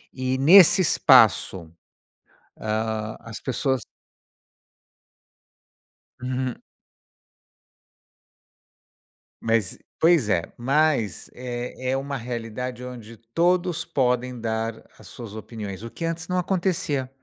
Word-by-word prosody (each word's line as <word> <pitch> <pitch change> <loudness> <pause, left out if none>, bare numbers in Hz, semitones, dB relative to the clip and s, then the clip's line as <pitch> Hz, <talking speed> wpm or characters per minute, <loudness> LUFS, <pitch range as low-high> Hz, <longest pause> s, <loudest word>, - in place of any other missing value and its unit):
E, 130 0 -1
nesse 175 +7 +7
espaço, 90 - +4 0.9
ah, 110 0 -2
as 115 -1 -8
pessoas 130 0 -1 2.4
Uhum. 130 -1 -2 2.9
Mas, 115 -5 0 0.2
pois 160 -9 +4
é, 85 -4 +2
mas 130 - +1
é 125 +1 -5
é 135 - +1
uma 140 +1 -4
realidade 120 +1 -5
onde 115 -3 -9 0.2
todos 175 0 +1
podem 125 -1 0
dar 110 0 -3
as - - -15
suas 110 -3 -9
opiniões, 110 -2 -7
o 115 - -6
que 165 - -5
antes 165 +1 -3
não 180 0 -1
acontecia. 175 -7 -1
125 Hz, 95 wpm, -24 LUFS, 115-150 Hz, 2.9 s, nesse